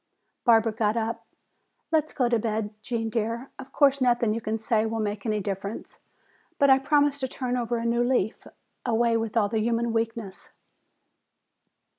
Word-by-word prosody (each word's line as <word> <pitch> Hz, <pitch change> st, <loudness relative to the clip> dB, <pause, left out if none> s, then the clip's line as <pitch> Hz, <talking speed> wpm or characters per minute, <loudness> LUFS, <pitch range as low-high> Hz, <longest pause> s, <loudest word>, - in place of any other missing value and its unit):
Barbara 225 Hz, -2 st, +5 dB
got 215 Hz, 0 st, 0 dB
up. 230 Hz, 0 st, -3 dB, 0.6 s
"Let's 310 Hz, -1 st, +2 dB
go 255 Hz, -4 st, +1 dB
to 235 Hz, -1 st, +2 dB
bed, 215 Hz, -1 st, -2 dB
Gene 225 Hz, 0 st, -3 dB
dear. 230 Hz, +3 st, -2 dB
Of 265 Hz, 0 st, -10 dB
course, 280 Hz, -1 st, +3 dB
nothing 240 Hz, -3 st, +3 dB
you 230 Hz, -, -3 dB
can 220 Hz, +1 st, -2 dB
say 220 Hz, 0 st, +1 dB
will 225 Hz, 0 st, -2 dB
make 205 Hz, 0 st, -3 dB
any 215 Hz, -1 st, 0 dB
difference. 200 Hz, +2 st, -5 dB, 0.6 s
But 280 Hz, -1 st, +5 dB
I 265 Hz, -, +6 dB
promise 285 Hz, +1 st, +2 dB
to 260 Hz, -, -1 dB
turn 250 Hz, -1 st, -3 dB
over 240 Hz, -1 st, -1 dB
a 230 Hz, -, -3 dB
new 235 Hz, +1 st, +2 dB
leaf. 240 Hz, -4 st, 0 dB, 0.4 s
Away 235 Hz, -1 st, +2 dB
with 225 Hz, 0 st, -1 dB
all 205 Hz, -2 st, +3 dB
human 230 Hz, +2 st, 0 dB
weakness!" 225 Hz, -3 st, -3 dB
230 Hz, 165 wpm, -26 LUFS, 220-245 Hz, 0.6 s, I